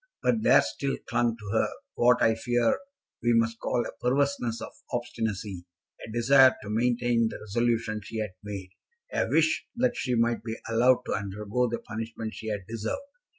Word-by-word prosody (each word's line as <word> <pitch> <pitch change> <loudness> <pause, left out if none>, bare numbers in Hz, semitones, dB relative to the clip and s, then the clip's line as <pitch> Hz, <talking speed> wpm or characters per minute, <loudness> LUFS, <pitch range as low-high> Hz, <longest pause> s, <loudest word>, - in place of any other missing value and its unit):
But 230 - +2
there 240 - +6
still 140 -1 -2
clung 120 -1 +1
to 105 -3 -9
her 110 - +2 0.2
what 125 +1 +4
I 115 - +5
fear 120 +1 +1 0.4
we 120 0 +3
must 115 0 +1
call 120 - 0
a - - -5
perverseness 125 -2 +1
of - - -7 0.2
obstinacy, 110 -6 -3 0.4
a - - -8
desire 130 +3 +6
to 105 - -5
maintain 120 0 +2
the - - -7
resolution 115 0 0
she 110 - -7
had 110 -3 -2
made, 100 -3 -7 0.4
a - - +1
wish 160 -1 +2
that 245 0 +1
she 125 -2 -1
might 115 0 +1
be 115 -1 -4
allowed 125 +2 +4
to - - -2
undergo 105 +4 -1
the 120 - -1
punishment 110 0 -6
she 110 - -8
had 105 -3 -3
deserved. 115 - -3
115 Hz, 175 wpm, -28 LUFS, 110-120 Hz, 0.4 s, there